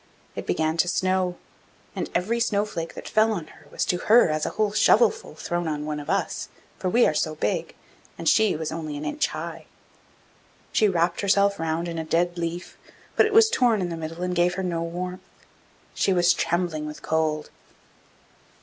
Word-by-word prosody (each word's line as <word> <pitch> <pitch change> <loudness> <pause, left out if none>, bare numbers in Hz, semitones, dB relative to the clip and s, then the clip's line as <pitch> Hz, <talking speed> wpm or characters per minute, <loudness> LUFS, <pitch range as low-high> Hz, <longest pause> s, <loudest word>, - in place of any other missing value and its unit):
It - - -6
began 160 +1 0
to 170 - +3
snow, 185 0 0 0.6
and - - -3
every 215 +7 0
snow 210 -3 +1
flake 165 -5 -6
that - - -8
fell 220 +1 +3
on 175 -6 -4
her 155 -2 -18
was - - -2
to 180 - 0
her 225 -1 +5
as 155 0 -1
a - - -6
whole 215 -1 +2
shovelful 450 - +3
thrown 175 -1 -3
on 150 -1 -3
one 150 -1 -3
of 145 - -8
us, - - -1 0.3
for 185 - -1
we 240 +6 +4
are - - +2
so 155 0 -1
big, - - -2 0.4
and - - -5
she 220 -5 +4
was 160 0 -4
only 155 -2 -5
an 145 - -6
inch 300 0 0
high. - - -7 1.0
She 215 - +3
wrapt 170 -1 +1
herself 200 0 +3
round 165 +1 -1
in 165 -1 -4
a - - -2
dead 175 +2 0
leaf, 170 +1 -5 0.4
but - - +5
it - - -4
was 445 +1 +7
torn 240 - +2
in 180 -2 -2
the 170 - -4
middle 165 +2 -6
and 180 0 -1
gave 175 0 +2
her 190 - -3
no 170 -2 -1
warmth; 180 +2 -4 0.7
she 195 - +1
was 175 0 +4
trembling 170 -3 -1
with 150 - -9
cold. 155 -1 -1
175 Hz, 195 wpm, -25 LUFS, 160-200 Hz, 1.0 s, was